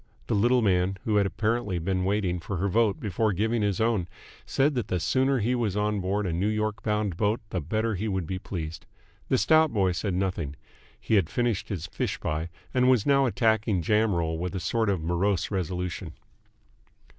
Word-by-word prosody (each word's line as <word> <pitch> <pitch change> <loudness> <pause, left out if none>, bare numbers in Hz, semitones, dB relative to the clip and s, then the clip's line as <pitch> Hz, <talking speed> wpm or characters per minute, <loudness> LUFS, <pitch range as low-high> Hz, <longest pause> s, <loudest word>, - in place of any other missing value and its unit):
The - - -1
little 120 +4 +3
man, 95 -1 +2
who 105 -2 +1
had 100 -1 +3
apparently 105 +1 -1
been 95 +2 -1
waiting 95 -2 0
for 90 +3 -4
her 95 +4 0
vote 105 0 +2
before 105 +1 0
giving 110 +4 0
his 100 -3 0
own, 110 -6 +1 0.4
said 145 +3 +2
that 120 -4 -2
the 90 - -1
sooner 130 +10 +2
he 120 +2 +1
was 110 -5 -1
on 105 0 0
board 100 +2 -1
a 90 - -1
New 90 +5 0
York 110 0 -1
bound 105 -4 -1
boat 105 +3 +1
the 90 - -1
better 110 +8 -1
he 100 +3 -2
would 95 -4 -1
be 95 +3 -4
pleased. 85 -4 -6 0.4
The - - +3
stout 155 +8 +4
boy 95 -4 +2
said 90 +2 -2
nothing. 90 -6 -2 0.4
He - - -3
had 95 -7 +3
finished 120 -5 -1
his 90 -6 -3
fish - - -3
pie, 80 +2 -2 0.2
and 125 0 +4
was 125 -5 +3
now 140 -1 +4
attacking 110 -6 +1
jam 105 +2 +2
roll 80 -1 -1
with 90 +2 -3
a - - -1
sort 110 +6 0
of 95 -5 0
morose 90 +4 0
resolution. 90 -2 -3
100 Hz, 200 wpm, -27 LUFS, 90-110 Hz, 0.4 s, stout